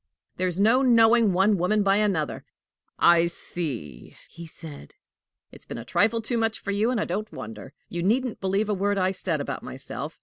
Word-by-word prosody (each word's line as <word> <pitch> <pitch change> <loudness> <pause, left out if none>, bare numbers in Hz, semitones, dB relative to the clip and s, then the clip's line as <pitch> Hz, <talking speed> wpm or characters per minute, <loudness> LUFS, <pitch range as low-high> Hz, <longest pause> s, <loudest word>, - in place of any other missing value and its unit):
"There's 185 0 -1
no 225 +6 +4
knowing 230 -3 +5
one 190 +2 +2
woman 205 +4 +2
by 195 0 +3
another!" 195 -8 -1 0.5
"I 170 0 +5
see!" 130 - -6
he 170 0 -10
said; 155 - -10 0.6
"it's - - -15
been - - -7
a 115 - -8
trifle 225 - +1
too 235 +1 -1
much 225 -1 0
for 200 - -4
you, 210 +3 +1
and 250 -3 0
I - - 0
don't 210 +4 -4
wonder! 110 +4 -9
You 175 - -4
needn't 235 +6 0
believe 195 +2 0
a 210 - 0
word 200 +1 0
I 185 0 +1
said 180 -4 -1
about 140 -2 -4
myself. 140 +3 -7
195 Hz, 190 wpm, -25 LUFS, 165-215 Hz, 0.6 s, knowing